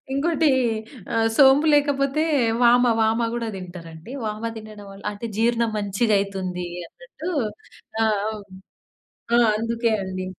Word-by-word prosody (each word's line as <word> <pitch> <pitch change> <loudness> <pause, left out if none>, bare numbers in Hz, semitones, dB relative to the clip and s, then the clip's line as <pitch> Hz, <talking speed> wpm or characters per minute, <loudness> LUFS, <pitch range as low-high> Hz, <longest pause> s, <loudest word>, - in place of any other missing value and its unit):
ఇంకోటి, 315 +1 +2 0.6
ఆహ్ 225 0 +2
సోంపు 280 +2 +6
లేకపోతే 285 +1 +1 0.4
వామ, 245 +1 +6 0.2
వామ 225 +1 +1
గూడా 235 -1 -3
తింటారండి. 175 0 -10
వామ 215 +1 -4
తినడం 215 -1 -10
వల్ల, 195 0 -13
అంటే 205 +3 -7
జీర్ణం 235 0 +1
మంచిగా 205 +2 0
అయితుంది 190 -2 -3 0.2
అన్నట్టు, 480 - -9 0.8
ఆహ్, 215 -2 +1
ఓహ్! 210 -2 -8 0.9
ఆ! - - +6 0.2
అందుకే 230 0 0
అండి. 185 0 -5
225 Hz, 120 wpm, -23 LUFS, 200-260 Hz, 0.9 s, సోంపు